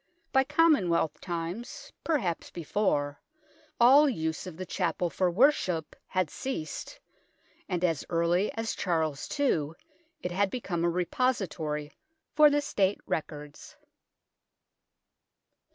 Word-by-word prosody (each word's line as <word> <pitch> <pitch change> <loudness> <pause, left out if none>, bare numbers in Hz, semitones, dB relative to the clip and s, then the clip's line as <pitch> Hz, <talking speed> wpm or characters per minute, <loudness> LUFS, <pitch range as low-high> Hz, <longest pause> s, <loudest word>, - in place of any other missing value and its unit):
By 265 - +5
Common 300 - +4
wealth 160 -2 0
times, 175 +6 -5
perhaps 235 - -1
before, 150 -4 -1 0.6
all 275 +5 +7
use 160 -7 -3
of 170 -3 -8
the 185 - -5
Chapel 175 -1 -1
for 185 -1 +1
worship 180 - +2
had 185 -5 -1
ceased, 260 - -5 0.7
and 180 -1 -1
as 165 -5 0
early 170 +3 +1
as 225 0 -2
Charles 160 -6 -1
II 160 - +1 0.5
it 180 - -2
had 195 +2 +1
become 185 -8 -3
a 170 - +3
repository 170 - -1 0.4
for 300 0 +7
the 290 0 +2
State 200 -8 0
records. 150 - -5
180 Hz, 115 wpm, -29 LUFS, 160-235 Hz, 0.7 s, all